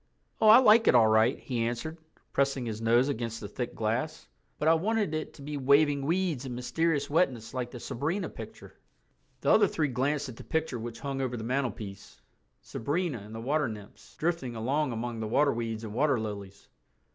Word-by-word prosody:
"Oh, 220 - +5
I 215 +2 +10
like 225 -2 +6
it - - +6
all 115 -2 +7
right," 110 +3 +4
he 125 -3 -3
answered, 140 +8 -3 0.3
pressing 135 -2 +1
his 110 -1 -4
nose 120 +3 +4
against 115 -4 -3
the 105 - -6
thick 120 +4 -5
glass, 120 +9 -2 0.3
"but 150 - -1
I 165 - +7
wanted 200 +1 0
it 155 0 -3
to 140 - -12
be 145 +1 -4
waving 140 +1 +3
weeds 170 -6 0
and 130 -2 -5
mysterious 145 +4 0
wetness 135 -8 0
like 125 -2 -3
the 120 - -9
Sabrina 160 - -2
picture." - - -10 0.7
The - - +2
other 210 -2 +6
three 155 -4 -1
glanced 140 +3 0
at 120 -3 -9
the - - -9
picture 160 -6 -2
which 115 0 -7
hung 135 -1 -3
over 125 -2 -2
the 110 - -5
mantelpiece—Sabrina 130 - -4
and 105 +2 -10
the - - -5
water 145 +4 0
nymphs, 105 -3 -11
drifting 160 -7 -2
along 135 +5 0
among 115 0 -4
the 110 - -3
waterweeds 115 -4 +1
and 105 -2 -6
water 135 0 +2
lilies. 100 -2 -7
130 Hz, 190 wpm, -29 LUFS, 115-155 Hz, 0.7 s, I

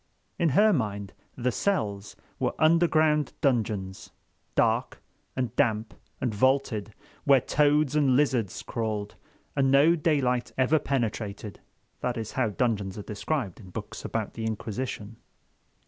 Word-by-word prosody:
In 170 -2 +3
her 215 +1 +6
mind 100 - -2 0.2
"the 125 0 0
cells" 105 - -1 0.2
were - - 0
underground 155 -2 +3
dungeons, 105 -9 -1 0.5
dark - - +1 0.4
and 125 -2 -2
damp 110 -5 +1 0.3
and 125 -4 -1
vaulted, 115 -3 +1 0.3
where 140 -2 +6
toads 150 +2 +2
and 140 -4 +4
lizards 125 -8 +1
crawled, 110 -3 -3 0.4
and 135 -2 +3
no 145 +5 +6
daylight 140 -6 +1
ever 135 +4 +3
penetrated. 110 -7 -3 0.4
That 125 -1 -2
is 110 -2 -4
how 130 -5 0
dungeons 105 -3 -1
are 105 - -5
described 105 - -3
in 95 -5 -12
books - - -7
about - - -3
the 115 - -6
Inquisition. 110 0 -4
125 Hz, 130 wpm, -27 LUFS, 105-145 Hz, 0.5 s, her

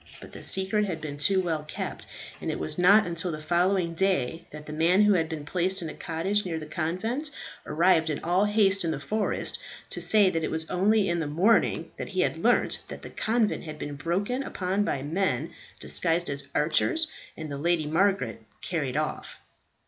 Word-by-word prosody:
But - - -12
the - - -10
secret 190 +2 +1
had 175 -5 -3
been 150 -2 -6
too 190 +6 +3
well 165 -4 -1
kept, 155 - -5 0.3
and - - -3
it - - -2
was 80 - -2
not 200 +5 +6
until 170 0 -1
the 155 - -5
following 175 +2 +1
day 170 -3 0
that 150 0 -10
the 150 - -7
man 170 +6 +4
who 210 0 +5
had 165 -3 +1
been 155 -3 -5
placed 185 +4 +1
in 165 -4 -4
a - - -6
cottage 190 +6 -1
near 170 -3 -3
the 155 - -6
convent 185 - -2 0.4
arrived 165 -1 +3
in 150 - -1
all 180 +4 +2
haste 200 -2 +3
in 165 - 0
the 150 -3 -2
forest, 215 +8 -1 0.3
to - - -3
say 205 -3 +4
that 165 -2 -1
it - - -1
was 160 0 -1
only 200 +3 +3
in 170 -1 0
the 160 - -2
morning 180 +10 +2
that - - -5
he - - 0
had - - +1
learnt - - +2
that - - -9
the - - -8
convent 220 -4 0
had 155 -1 -7
been 145 -1 -5
broken 195 - -1
open 190 -3 -1
by 140 -10 -2
men 155 -2 -1 0.3
disguised 170 -1 0
as 140 -1 -2
archers, 320 - +2 0.3
and 155 -2 -6
the 140 - -4
Lady 170 0 +1
Margaret 155 - +1 0.2
carried 145 -6 -2
off. 155 0 -3
170 Hz, 200 wpm, -27 LUFS, 155-195 Hz, 0.4 s, not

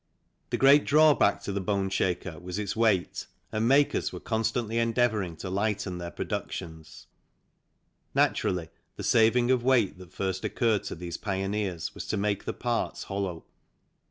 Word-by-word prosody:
The - - -1
great 140 +2 +6
drawback 150 -8 +4
to - - -3
the 100 0 -2
boneshaker 95 -3 -1
was 90 +1 -5
its 105 -2 -3
weight, 110 -5 +1 0.2
and 110 +1 0
makers 140 +3 +3
were - - -7
constantly 115 0 -1
endeavouring 115 -6 +1
to 95 - -6
lighten 100 -2 -1
their 85 0 -5
productions. 80 -1 -6 1.1
Naturally, 85 -4 +1 0.3
the - - -7
saving 120 +2 +4
of 130 -2 +3
weight 120 -8 +2
that 90 -1 -12
first 95 -1 -3
occurred 115 -4 +1
to - - -4
these 85 0 -6
pioneers 95 -4 -2
was - - -7
to 110 - -1
make 100 0 -1
the - - -2
parts 120 -1 -2
hollow. 95 -4 -4
100 Hz, 150 wpm, -28 LUFS, 90-115 Hz, 1.1 s, great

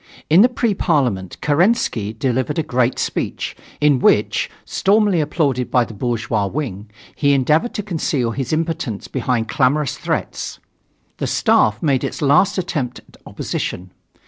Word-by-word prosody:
In 170 +5 +7
the 245 - +6
Pre 240 -3 0
Parliament 125 - 0
Kerensky 155 - +1
delivered 130 +5 -1
a 160 - +1
great 125 -2 0
speech, - - -3 0.2
in 145 -3 +3
which, - - +2 0.2
stormily 200 -3 +2
applauded 140 -5 0
by 125 -2 +3
the 115 - -10
bourgeois 115 -2 -1
wing, 105 -5 -5 0.3
he 140 -1 +2
endeavored 150 - +2
to 210 - -2
conceal 150 - -1
his 130 +1 -3
impotence 160 -9 -2
behind 120 -4 -1
clamorous 140 +2 +1
threats. - - -3 0.6
The - - -2
Staff 105 +5 +2
made 140 -5 +2
its - - -4
last 150 +8 +3
attempt 150 -9 -2
at - - -20
opposition. 90 0 -4
140 Hz, 145 wpm, -19 LUFS, 120-165 Hz, 0.6 s, In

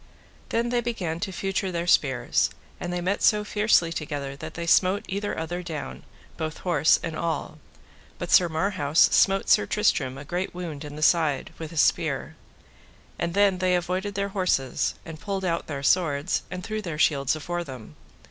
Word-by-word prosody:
Then 235 +1 0
they 240 0 +1
began 185 -9 -3
to 195 +1 -3
feutre 195 +1 -2
their 170 -1 -2
spears, 135 -7 +2 0.3
and 175 - -4
they 175 0 -2
met 190 +3 -1
so 210 -1 +4
fiercely 205 -5 +2
together 145 -3 -4
that 155 +3 -8
they 170 - -4
smote 185 +4 +3
either 200 +2 -3
other 175 +2 -3
down, 165 -4 -6 0.4
both 155 -1 -4
horse 155 -4 +4
and 165 -1 -3
all. 165 0 -3 0.6
But - - -5
Sir 175 -2 +6
Marhaus 160 -3 -1
smote 195 0 +3
Sir - - +4
Tristram 140 -11 +1
a 140 - -9
great 180 +4 -3
wound 165 -5 -6
in 145 -1 -8
the 155 - -4
side 160 -5 +2
with 160 -1 -5
his 160 -2 +2
spear, - - 0 0.8
and 170 +1 -2
then 200 -2 +3
they 185 0 +2
avoided 185 +3 -2
their 200 0 -1
horses, 180 -10 0
and 160 -2 -8
pulled 195 0 -3
out 170 -2 -1
their 140 -3 -5
swords, 155 -1 +2
and 180 0 -6
threw 215 +2 -3
their 170 -6 -5
shields 140 -2 +2
afore 175 +3 -3
them. 130 - -10
175 Hz, 180 wpm, -25 LUFS, 155-190 Hz, 0.8 s, Sir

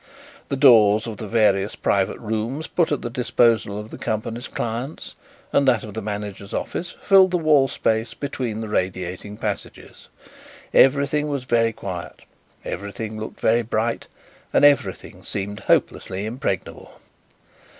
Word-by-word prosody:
The 140 - 0
doors 110 -5 +6
of 110 -3 -6
the 110 - -6
various 105 -2 +2
private 95 -1 0
rooms 115 +7 -3
put 170 -1 0
at 145 - -1
the 120 - -3
disposal 115 -4 +2
of 105 +1 -7
the - - -9
company's 115 -1 -3
clients, 120 +6 -5 0.4
and 140 - +3
that 120 -5 +3
of 105 - -8
the 110 - -4
manager's 100 -1 -5
office, 175 +1 -4
filled 195 -1 +6
the 180 - +1
wall 155 -5 +4
space 115 -1 -1
between 125 -6 -4
the 110 - -4
radiating 95 0 -3
passages. 105 -3 -6 0.6
Everything 140 +2 +4
was 140 -3 -2
very 115 -2 +2
quiet, 90 - -7 0.4
everything 105 +2 -5
looked 110 - -7
very 115 +2 +3
bright, 115 0 -2 0.4
and 145 - +5
everything 140 -10 +1
seemed 100 +1 -4
hopelessly 95 +2 0
impregnable. 110 -5 -4
110 Hz, 140 wpm, -22 LUFS, 105-130 Hz, 0.6 s, doors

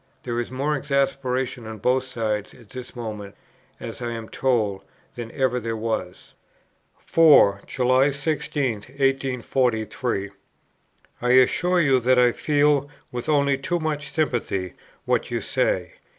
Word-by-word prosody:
There 120 -1 -2
is 120 - -3
more 140 +4 -1
exasperation 130 -3 -1
on 110 0 -7
both 125 +5 +1
sides 110 -4 -3
at 115 -4 -18
this 130 0 -8
moment, 105 -4 -6 0.4
as 115 +2 -7
I 120 - -2
am 115 -1 -7
told, 110 -7 0 0.3
than 120 -1 -7
ever 130 -3 0
there 115 -1 -3
was." 110 -5 -4 0.6
4. 145 -12 +5
"July 130 +2 +3
16, 145 -2 -1
1843. 125 -4 -1 0.9
I 125 - 0
assure 175 +8 +4
you 135 -4 +4
that 125 +1 +3
I 125 -1 +5
feel, 145 0 +2 0.2
with 125 +4 -5
only 140 -2 +2
too 175 +6 -1
much 150 -3 -3
sympathy, 115 - -1 0.3
what - - 0
you - - -1
say. - - -1
125 Hz, 135 wpm, -24 LUFS, 115-140 Hz, 0.9 s, 4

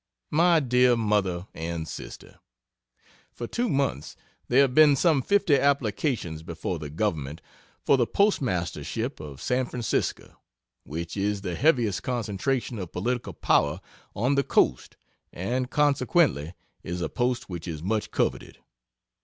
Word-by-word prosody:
MY 170 +1 +4
DEAR 125 -2 +4
MOTHER 100 -5 0
AND 80 0 -4
SISTER, - - -9 0.9
For 120 - -6
two 240 - -1
months 135 - -1 0.3
there 130 +3 +5
have 135 -2 +2
been 150 0 +7
some 155 -1 +3
fifty 200 -2 +3
applications 120 - 0
before 85 +1 -4
the 75 -1 -6
government 75 -4 -2 0.5
for 140 - +5
the 120 -2 +2
postmastership 115 - -1
of 75 -3 -9
San 125 0 0
Francisco, 120 -4 -3 0.5
which 85 +3 -5
is 100 0 -1
the 90 -3 -4
heaviest 120 - +2
concentration 120 +1 -2
of 90 -3 -6
political 120 +6 -2
power 75 +4 +2 0.4
on 125 +7 +1
the 140 0 +2
coast 65 - +1 0.3
and 125 +8 -2
consequently 140 - +2 0.3
is 90 +1 -5
a - - 0
post 125 -1 -1
which 85 -2 -7
is 80 -2 -5
much 105 +3 -1
coveted. - - -2
115 Hz, 135 wpm, -26 LUFS, 85-135 Hz, 0.9 s, been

